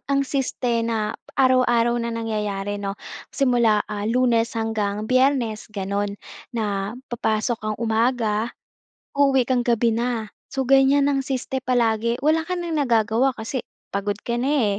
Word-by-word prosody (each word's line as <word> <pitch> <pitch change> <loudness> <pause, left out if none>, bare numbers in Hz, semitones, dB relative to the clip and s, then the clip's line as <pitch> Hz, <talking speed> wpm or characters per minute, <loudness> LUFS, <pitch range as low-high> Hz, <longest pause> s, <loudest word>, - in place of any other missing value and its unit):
ang 275 0 +2
siste 250 -3 -1
na 225 -2 -1 0.2
araw-araw 250 -3 +4
na 235 - -2
nangyayari 210 -3 -3
'no, 200 0 -4 0.3
simula, 240 -6 +2
ah, 210 +1 -4
Lunes 235 -1 +2
hanggang 215 -2 -1
Biyernes, 255 -3 +1
ganon. 200 0 -3 0.3
Na, 210 -2 -2 0.2
papasok 220 0 0
kang 215 0 -3
umaga, 225 -1 +1 0.7
uuwi 275 -2 +4
kang 255 -2 +2
gabi 235 -1 +2
na. 230 -2 -2 0.2
So, 270 -1 -1
ganyan 275 +1 +5
ang 275 -1 +1
siste 265 0 -3
palagi, 235 -2 +1
wala 320 +1 +3
ka 365 - -1
nang 340 -2 -3
nagagawa 235 +1 +2
kasi 230 +4 -3 0.3
pagod 200 +1 -1
ka 235 - -1
na, 250 -7 +1
230 Hz, 140 wpm, -23 LUFS, 215-255 Hz, 0.7 s, ganyan